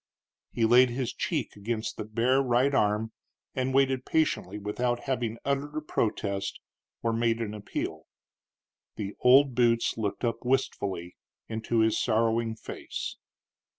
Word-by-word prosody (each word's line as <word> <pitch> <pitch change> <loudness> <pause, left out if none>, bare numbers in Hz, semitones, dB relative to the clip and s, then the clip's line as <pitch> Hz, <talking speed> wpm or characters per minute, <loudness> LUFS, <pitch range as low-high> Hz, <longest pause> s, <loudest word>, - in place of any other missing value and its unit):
He 115 - +1
laid 125 +2 +6
his 125 0 -2
cheek 150 -9 -2
against 110 +2 -3
his 110 - -4
bare 120 +5 +2
right 130 +2 +2
arm 105 -2 +1 0.4
and 130 0 -1
waited 135 -1 +2
patiently, 130 - 0
without 120 +4 -1
having 120 -4 -2
uttered 140 +2 -1
a - - -1
protest 100 -8 -2 0.4
or 115 -1 +1
made 115 0 +1
an 110 -2 -3
appeal. 105 -1 -5 0.9
The 100 -2 -4
old 135 +2 +6
boots 115 -1 +2
looked 105 +3 -2
up 115 -1 0
wistfully 100 -9 -1 0.3
into 115 +1 0
his 110 0 +2
sorrowing 115 0 +1
face. - - -6
115 Hz, 135 wpm, -28 LUFS, 110-130 Hz, 0.9 s, laid